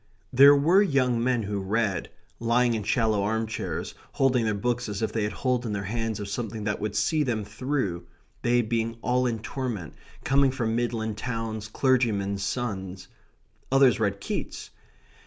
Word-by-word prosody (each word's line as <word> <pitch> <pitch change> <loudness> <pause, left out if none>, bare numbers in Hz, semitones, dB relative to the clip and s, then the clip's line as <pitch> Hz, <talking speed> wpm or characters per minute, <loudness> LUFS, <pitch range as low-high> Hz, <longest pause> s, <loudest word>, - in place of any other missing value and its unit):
There 140 +3 +8
were 165 +8 +5
young 130 - +2
men 125 -2 +1
who 100 0 -2
read, 100 0 -1 0.3
lying 120 +1 +2
in 110 - -1
shallow 110 0 +1
arm 110 +2 0
chairs, 110 - -4 0.2
holding 130 -3 +2
their 110 -1 0
books 120 +2 -1
as 105 +1 -3
if - - -1
they 110 - 0
had 105 0 -1
hold 125 -2 -1
in 110 -3 -3
their 100 -1 -2
hands 115 +1 -2
of 105 - -5
something 110 0 -4
that 105 0 -1
would 105 0 -3
see 130 +9 +2
them 115 -7 -1
through; 115 -10 -3 0.3
they 120 0 +2
being 115 0 -1
all 125 0 +2
in 120 - 0
a 110 - -9
torment, 115 - -4 0.3
coming 135 +1 +3
from 115 -4 -1
midland 110 -3 -2
towns, 115 -2 -4
clergymen's 110 -6 +1
sons. 95 -4 -4 0.6
Others 135 -5 +5
read 100 -2 0
Keats. - - -5
115 Hz, 175 wpm, -26 LUFS, 105-125 Hz, 0.6 s, There